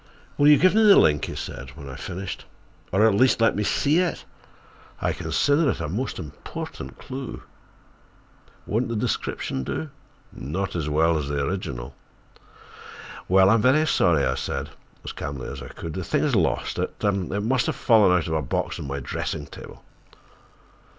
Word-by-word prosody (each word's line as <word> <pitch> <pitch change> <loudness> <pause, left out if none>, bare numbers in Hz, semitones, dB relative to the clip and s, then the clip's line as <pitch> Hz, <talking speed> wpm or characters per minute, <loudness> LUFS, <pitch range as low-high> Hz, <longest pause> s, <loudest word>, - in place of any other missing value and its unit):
"Will 145 - +4
you 150 -1 +8
give 185 +4 +4
me 220 - +4
the 210 -2 +8
link," 75 -2 +4
he - - -6
said, 65 +2 -6
when 70 - -9
I 65 - -7
finished, 90 +1 -6 0.5
"or, 100 +4 +4
at 110 - +5
least, 125 +4 +4
let 115 - +3
me 105 - -1
see 145 - +2
it? 180 -2 -1 0.7
I - - 0
consider 145 +1 +1
it - - -1
a - - -3
most 110 - -3
important 70 -4 -8
clue." 135 -1 -7 1.2
"Won't 115 +4 0
the 115 - -2
description 65 -9 -2
do?" 150 - -4 0.4
"Not 85 +9 -4
as 80 -3 -2
well 80 +2 +2
as 70 - -4
the 70 -1 -1
original." 70 -10 -4 1.3
"Well, 95 +1 +5
I'm 115 -1 +4
very 135 +7 +4
sorry," 85 - +3
I 65 - +1
said, - - -4 0.3
as - - -5
calmly 70 -3 -6
as 70 0 -7
I 60 - -8
could, 80 +5 -7
"I—the 95 - -3
thing - - 0
is - - +1
lost. - - 0
It—it 100 0 -1
must 125 +3 +1
have - - -1
fallen 110 -6 +5
out 90 -3 +2
of 80 - -3
a 80 - +1
box 65 - -2
on - - -6
my 70 +1 -3
dressing - - -4
table." - - -12
95 Hz, 175 wpm, -24 LUFS, -, 1.3 s, you